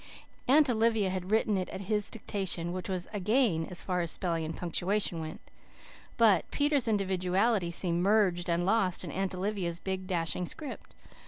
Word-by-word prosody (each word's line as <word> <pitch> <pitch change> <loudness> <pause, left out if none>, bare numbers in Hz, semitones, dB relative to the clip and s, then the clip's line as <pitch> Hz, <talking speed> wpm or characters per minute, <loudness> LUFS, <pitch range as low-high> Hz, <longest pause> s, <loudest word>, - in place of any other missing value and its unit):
Aunt 295 +3 +6
Olivia 225 -4 +2
had 185 0 -4
written 215 -1 +2
it 185 -1 -2
at - - -6
his 210 +1 -1
dictation, 190 -6 -1
which 185 +2 -5
was 180 -2 -3
a 205 - -2
gain, 205 -5 +2
as 180 - -4
far 180 -1 -1
as 170 - -1
spelling 165 -1 -1
and 160 0 -5
punctuation 180 +1 0
went. 155 0 -6 0.8
But 210 -8 +4
Peter's 290 -4 +1
individuality 195 0 +1
seemed 170 0 0
merged 185 -3 +2
and 170 +1 +1
lost 195 -3 +1
in - - -6
Aunt 190 0 -2
Olivia's 185 -3 -2
big, 190 +1 -4
dashing 175 -1 -1
script. 300 - -7
190 Hz, 170 wpm, -30 LUFS, 175-215 Hz, 0.8 s, Aunt